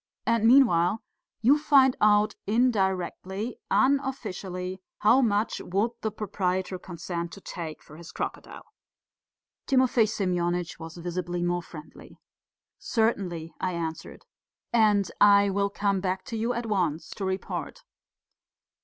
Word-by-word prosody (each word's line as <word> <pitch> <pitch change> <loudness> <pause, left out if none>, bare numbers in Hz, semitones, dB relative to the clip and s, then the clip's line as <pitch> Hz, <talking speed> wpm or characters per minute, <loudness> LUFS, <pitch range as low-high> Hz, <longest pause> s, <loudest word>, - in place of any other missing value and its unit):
And 230 -1 +3
meanwhile, 220 -7 +4 0.4
you 280 +6 +5
find 275 -4 +5
out 210 0 +4
indirectly, 200 -2 0
unofficially, 200 -9 -1 0.2
how 235 +6 +5
much 215 -2 0
would 200 +6 0
the 220 - -1
proprietor 190 -3 -2
consent 170 -1 -5
to - - -9
take 165 -4 -7
for 155 - -14
his 170 0 -11
crocodile?" - - -6 1.0
Timofey 255 -4 +3
Semyonitch 175 -4 -1
was 165 +1 -9
visibly 175 0 -3
more 175 0 0
friendly. 160 -2 -13 0.6
"Certainly," 185 -8 -1
I 185 -1 -1
answered. 165 -1 -6 0.5
"And 210 -4 +3 0.3
I 200 0 +2
will 200 +1 0
come 200 -1 0
back 190 0 -2
to 230 - -6
you 225 +2 -1
at 240 0 -3
once 175 -7 -1
to 200 - -6
report." 190 - -4
195 Hz, 120 wpm, -27 LUFS, 175-225 Hz, 1.0 s, you